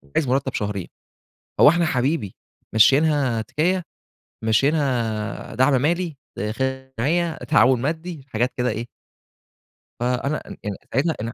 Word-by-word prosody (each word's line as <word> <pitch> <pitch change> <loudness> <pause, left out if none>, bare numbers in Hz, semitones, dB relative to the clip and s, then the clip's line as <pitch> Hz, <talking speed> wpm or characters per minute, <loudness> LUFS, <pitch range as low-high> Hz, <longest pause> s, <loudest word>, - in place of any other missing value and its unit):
عايز 150 - +2
مرتب 130 +1 0
شهرين، 100 -3 -3 0.7
هو - - +9
إحنا 170 +2 +2
حبيبي 130 - 0 0.4
ممشيينها 135 0 +4
تِكيّة؟ 175 - 0 0.6
ممشيينها 115 -3 0
دعم 130 +1 +3
مالي، 170 +2 0 0.2
داخل 130 +6 -3
جمعية، 165 +6 +1
تعاون 130 -5 +3
مادي." 160 +2 -3
حاجات 120 +2 0
كده 125 0 +1
إيه 115 +1 -4 1.1
فأنا 125 +4 0
أ - - -10
يعني 115 - -2
130 Hz, 110 wpm, -22 LUFS, 115-155 Hz, 1.1 s, هو